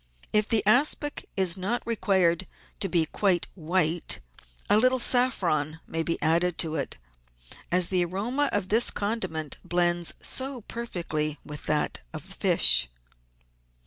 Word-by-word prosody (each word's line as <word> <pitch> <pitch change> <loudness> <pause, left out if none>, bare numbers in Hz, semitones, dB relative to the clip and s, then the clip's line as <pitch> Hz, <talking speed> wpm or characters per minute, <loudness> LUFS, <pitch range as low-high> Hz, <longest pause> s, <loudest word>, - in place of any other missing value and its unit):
If 210 0 +2
the 220 -3 +3
aspic 290 +6 +2
is 185 -3 +4
not 200 +6 -2
required 190 -6 +1 0.3
to 195 - -1
be 170 -2 +2
quite 185 +1 0
white, 170 -1 0 0.5
a - - +4
little 255 +4 +3
saffron 180 - +2
may 165 - -3
be 165 +1 -2
added 170 +2 +2
to 160 -1 0
it, - - -3 0.7
as 180 0 +5
the 185 -2 +1
aroma 230 +11 -1
of 200 -2 0
this 225 +3 +4
condiment 185 - -3
blends 175 -1 +1
so 265 -1 -2
perfectly 165 -10 -4
with 150 -1 -9
that 150 -1 0
of - - -7
fish. - - +3
185 Hz, 135 wpm, -26 LUFS, 165-220 Hz, 0.7 s, as